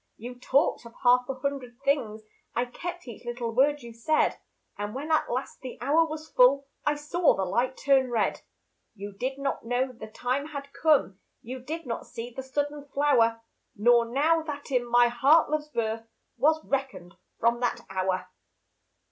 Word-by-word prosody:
You 245 +2 -8
talked 265 +1 +2
of 230 - -16
half 250 +1 +4
a 270 - -2
hundred 260 -2 -4
things, 230 -7 0 0.3
I 245 - +1
kept 345 +6 -7
each 235 -1 -9
little 240 -1 -4
word 285 +3 +3
you 235 -1 -9
said; 270 +7 +1 0.4
And 205 +2 -5
when 295 +4 -4
at 315 - +2
last 255 +3 -4
the 255 - -7
hour 310 +6 +3
was 310 0 -7
full, 275 +2 +5 0.2
I 295 - +2
saw 300 +3 +2
the 190 - -1
light 250 +7 0
turn 270 -2 +3
red. 225 -4 0 0.5
You 200 0 -7
did 255 +7 -3
not 275 0 -2
know 245 +3 0
the 230 -3 -10
time 255 +6 -2
had 280 -2 -8
come, 290 - +2 0.2
You 255 +3 -6
did 315 +6 -6
not 235 -2 -4
see 240 0 -7
the - - -4
sudden 290 +2 -3
flower, 235 -6 +2 0.3
Nor 235 +2 +4
know 300 +7 +2
that 285 -1 -6
in 245 -2 +1
my 240 0 +6
heart 275 +7 +4
Love's 305 0 -1
birth 225 -4 -2 0.3
Was 310 +5 +2
reckoned 265 -11 -3 0.3
from 235 +1 +2
that 245 -1 -1
hour. 185 -1 -1
255 Hz, 175 wpm, -27 LUFS, 235-285 Hz, 0.5 s, my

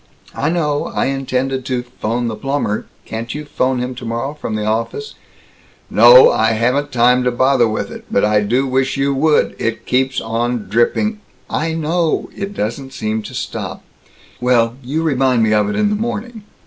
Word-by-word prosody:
"I 145 - -1
know. 150 -4 0
I - - -1
intended 135 -1 -1
to 125 -2 -2
'phone 120 -1 -3
the 110 - -3
plumber 135 -3 -2 0.2
Can't 115 +2 -5
you 150 0 -5
'phone 130 -2 0
him 125 +1 -3
tomorrow, 120 +2 -4
from 150 -7 -5
the 105 -1 -2
office?" 115 +6 -2 0.8
"No, 120 +4 +8
I 110 +1 +2
haven't 125 +6 0
time 125 +1 +3
to 125 - +2
bother 125 0 +3
with 110 - -3
it. - - -9
But 100 - +2
I 105 0 +3
do 120 +6 +1
wish 130 +1 0
you 140 0 +1
would. 150 +2 +2
It 115 0 -2
keeps 130 +1 +1
on 115 -1 -2
dripping 165 - +1 0.2
" - - -35 0.2
"I 165 - -2
know, 165 +1 0
it 200 0 -5
doesn't 130 - -4
seem 110 -2 -2
to 105 - -9
stop. - - -5 0.6
Well, 120 -1 +2
you 150 +6 -2
remind 130 -6 +2
me 110 -1 +2
of 105 -1 +2
it - - -2
in 210 -1 +1
the - - +1
morning." 225 0 -4
125 Hz, 185 wpm, -18 LUFS, 115-145 Hz, 0.8 s, No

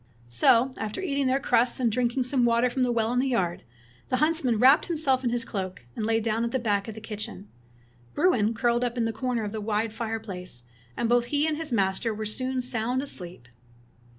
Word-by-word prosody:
'' 120 - -27
So 250 +3 +5
after 215 -1 -4
eating 280 -7 -1
all 255 - +2
their 270 - +2
crusts, 245 -2 +2
and 240 -3 +2
drink 240 +2 0
ing 260 - +3
some 255 0 +1
water 240 +1 +3
from 260 - -2
the 250 -1 +2
well 230 0 0
in 250 - +2
the 265 - +1
yard, 185 -9 0 0.5
the 255 - +1
huntsman 305 -6 +2
wrapped 265 +6 +5
himself 295 -6 +1
in 245 - +1
his 235 -1 -2
cloak, 185 - -5
and 215 - -2
lay 225 0 +2
down 225 +1 -1
at 235 - 0
the 260 - 0
back 205 -4 0
of 220 - -6
the - - -7
kitchen. 210 -2 -6 0.7
Bruin 230 - +2
curled 240 +1 +1
up 245 0 -2
in 230 -1 +1
a 225 - -3
corner 250 -1 -2
of 205 - -4
the 220 0 -4
wide 215 +1 -1
fire 225 0 -3
place, 180 - -8 0.3
and 235 - 0
both 240 0 +3
he 290 +4 +1
and 315 -1 0
his 315 -2 -5
master 205 +1 0
were 215 0 -4
soon 255 +4 -2
sound 245 +2 -1
asleep. 175 - -6
235 Hz, 235 wpm, -26 LUFS, 215-255 Hz, 0.7 s, So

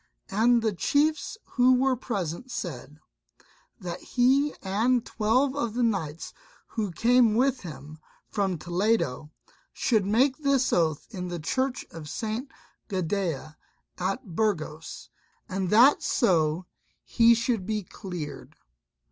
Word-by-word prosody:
And 230 +3 +3
the 220 -2 +1
chiefs 305 - +1
who 255 0 +4
were 260 +1 +2
present 210 -2 -4
said, 150 - -6 0.8
that 180 -3 -6
he 270 +4 +2
and 225 +5 +1
twelve 250 +6 +1
of 235 -6 -2
the 245 - +1
knights 170 -9 -2 0.4
who 215 -3 -2
came 230 +4 +4
with 260 +2 +2
him 155 -2 -9 0.3
from 195 -4 -1
Toledo, 175 - 0 0.4
should 220 -5 +1
make 255 +6 +3
this 275 -3 +2
oath 160 -4 +1
in 180 -4 -5
the 175 -1 -4
church 260 - -2
at 160 -2 -8
St. 225 - -4 0.4
Gadea 175 -5 -2 0.4
at 190 0 -3
Burgos, 165 -7 -2 0.4
and 190 -3 -2
that 240 +8 +6
so 170 - +1 0.4
he 235 0 +5
should 230 -4 -1
be 215 -1 -1
cleared. 175 -4 -8
210 Hz, 120 wpm, -27 LUFS, 175-245 Hz, 0.8 s, that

